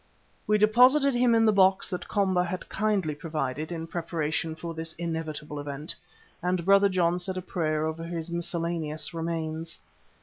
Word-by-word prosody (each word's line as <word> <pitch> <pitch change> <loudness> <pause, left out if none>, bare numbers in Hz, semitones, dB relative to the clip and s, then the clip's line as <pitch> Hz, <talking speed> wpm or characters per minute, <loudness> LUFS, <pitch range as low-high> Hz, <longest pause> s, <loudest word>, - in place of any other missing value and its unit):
We 210 - +4
deposited 250 +7 +5
him 240 -1 +4
in 225 0 +4
the 215 - +6
box 190 -1 +4
that 180 - -4
Komba 190 -3 +2
had 180 +1 -4
kindly 200 -7 0
provided 150 0 -3
in 165 -1 -4
preparation 165 -1 -2
for 165 +1 -6
this 160 0 -5
inevitable 160 -3 -4
event, 145 +2 -5 0.5
and 180 -1 0
Brother 200 +1 +6
John 175 -2 +1
said 185 +1 -3
a - - -2
prayer 155 -4 -1
over 160 +1 -3
his 170 0 -4
miscellaneous 170 -2 -2
remains. 165 0 -3
170 Hz, 160 wpm, -27 LUFS, 160-190 Hz, 0.5 s, the